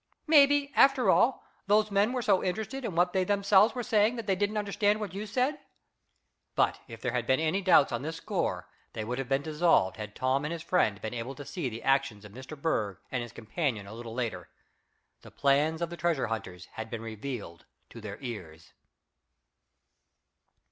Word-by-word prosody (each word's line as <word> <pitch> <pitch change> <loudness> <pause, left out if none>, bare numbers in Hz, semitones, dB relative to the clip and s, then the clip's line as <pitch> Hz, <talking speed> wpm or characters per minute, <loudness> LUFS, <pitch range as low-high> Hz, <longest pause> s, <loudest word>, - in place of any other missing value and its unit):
Maybe, 285 -2 +5
after 270 -2 +5
all, 255 +2 +3 0.2
those 210 +1 +3
men 200 +3 +3
were 250 -1 -2
so 200 -4 +3
interested 220 +8 -3
in 200 -8 -4
what 175 +1 +2
they 190 -1 +2
themselves 200 +3 +4
were 245 - -2
saying 220 0 +2
that 230 -2 -5
they 195 -2 +1
didn't 205 +3 -1
understand 205 0 +1
what 205 -5 -5
you 205 +2 -5
said." 255 +7 0 1.0
But - - +2
if 115 -3 -10
there 125 - -1
had 120 -1 -2
been 130 - +3
any 160 +5 0
doubts 180 -7 +5
on 120 - -2
this 160 +3 -4
score 125 - -2 0.3
they 110 - -4
would 125 +3 -3
have 135 -1 -4
been 135 +1 +1
dissolved 155 - +2
had 105 -1 -7
Tom 130 +2 0
and 150 - -3
his 170 -1 -5
friend 170 - +1
been 110 - -4
able 120 +3 -5
to 145 - -9
see 165 -6 -3
the 115 0 -8
actions 135 -6 +1
of 105 - -11
Mr. 130 +6 -10
Berg 105 - -1
and 125 - -1
his 120 -1 -7
companion 115 - -3
a 100 - -10
little 115 0 -8
later. 120 -3 -3 0.7
The - - -13
plans 150 +4 +1
of 170 - -3
the 175 - -6
treasure 170 -5 0
hunters 95 -6 -5
had 110 0 -7
been 115 -1 -5
revealed 110 -6 -7 0.3
to 115 - -10
their 105 -1 -7
ears. 85 - -8
150 Hz, 195 wpm, -29 LUFS, -, 1.0 s, Maybe